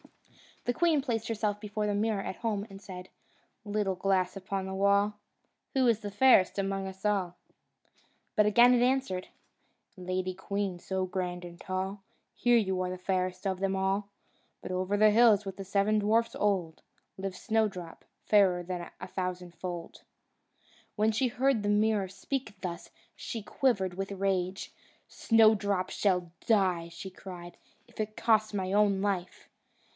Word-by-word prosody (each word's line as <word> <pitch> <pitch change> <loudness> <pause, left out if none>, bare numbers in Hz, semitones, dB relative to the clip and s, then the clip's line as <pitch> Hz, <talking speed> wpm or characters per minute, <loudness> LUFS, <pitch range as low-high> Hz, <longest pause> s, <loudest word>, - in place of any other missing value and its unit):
The 245 - +1
queen 320 0 +2
placed 230 -4 -2
herself 210 -2 -1
before 210 0 -3
the 205 - 0
mirror 210 -1 0
at - - -5
home 210 -3 -2
and 195 0 -10
said: 185 -2 -9 0.6
"Little 205 -2 -1
glass 185 0 +1
upon 195 0 -4
the 190 - -5
wall, 200 +1 +2 0.6
Who 260 -2 +3
is 230 -3 +3
fairest 205 -1 +4
among 195 0 -1
us 190 0 -10
all?" 190 -4 0 1.0
But 210 - +5
it - - +4
again 240 +3 +6
answered: 250 -8 +1 0.7
"Lady 185 0 -2
queen, 195 0 -3
so 190 +1 -2
grand 180 -1 -4
and 170 0 -11
tall, 190 +1 -3 0.3
Here 245 -1 +4
you 190 -4 0
are 185 0 -2
fairest 185 0 -2
of 190 -1 -1
them 195 0 0
all; 195 +1 0 0.5
But - - -6
over 185 +2 0
the 215 +1 +6
hills, 215 -2 +5
with 195 -1 -6
the 195 - -5
seven 200 +2 +1
dwarfs 225 +3 +1
old, 185 -6 0 0.4
Lives 190 -1 -5
Snowdrop, 210 -7 -1 0.2
fairer 185 -4 +4 0.3
a 185 - -6
thousandfold." 180 -2 -5 0.9
When 215 +1 +2
she 235 +4 +1
heard 255 -1 +1
the 205 - -1
mirror 210 -1 +2
speak 215 +3 -5
thus, 175 -2 -5 0.3
she 225 -3 -6
quivered 200 -7 0
with 195 +1 -4
rage. 190 -1 -1 0.4
"Snowdrop 205 -4 +3
shall 180 -4 0 0.2
die," 185 -6 +2
she 170 +3 -8
cried, 175 -2 -10 0.3
"if 235 - -19
it 215 0 -3
costs 220 -2 +2
my 190 -2 -2
own 205 -2 +3
life!" 190 -3 -2
195 Hz, 150 wpm, -30 LUFS, 185-215 Hz, 1.0 s, again